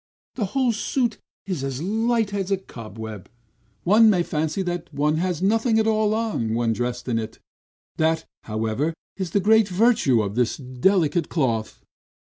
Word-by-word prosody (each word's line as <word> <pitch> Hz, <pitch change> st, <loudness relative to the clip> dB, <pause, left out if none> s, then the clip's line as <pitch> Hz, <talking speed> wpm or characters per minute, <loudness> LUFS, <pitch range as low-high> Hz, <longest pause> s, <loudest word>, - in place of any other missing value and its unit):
The 220 Hz, -, -1 dB
whole 255 Hz, -3 st, +3 dB
suit 230 Hz, +1 st, -1 dB, 0.3 s
is 180 Hz, -8 st, -3 dB
as 135 Hz, -1 st, -3 dB
light 220 Hz, +4 st, 0 dB
as 195 Hz, -2 st, -2 dB
a 195 Hz, -, +2 dB
cobweb; 110 Hz, -, -9 dB, 0.5 s
one 215 Hz, +4 st, +6 dB
might 180 Hz, -4 st, +2 dB
fancy 160 Hz, +5 st, -1 dB, 0.3 s
one 150 Hz, +2 st, +1 dB
has 180 Hz, 0 st, -1 dB
nothing 225 Hz, +3 st, +2 dB
at 220 Hz, -, +3 dB
all 215 Hz, -1 st, +2 dB
on, 210 Hz, -, -1 dB
when 115 Hz, -1 st, +1 dB
dressed 125 Hz, +2 st, -3 dB
in 115 Hz, -2 st, +1 dB
it; 110 Hz, 0 st, -6 dB, 0.6 s
that, 160 Hz, 0 st, +1 dB, 0.2 s
however, 115 Hz, +9 st, -1 dB, 0.2 s
is 190 Hz, -3 st, -3 dB
the 200 Hz, -, +1 dB
great 220 Hz, +2 st, +4 dB
virtue 190 Hz, -, +3 dB
of 100 Hz, -1 st, -3 dB
this 120 Hz, +1 st, 0 dB
delicate 155 Hz, +5 st, +1 dB
cloth." 115 Hz, -8 st, -1 dB
170 Hz, 155 wpm, -23 LUFS, -, 0.6 s, one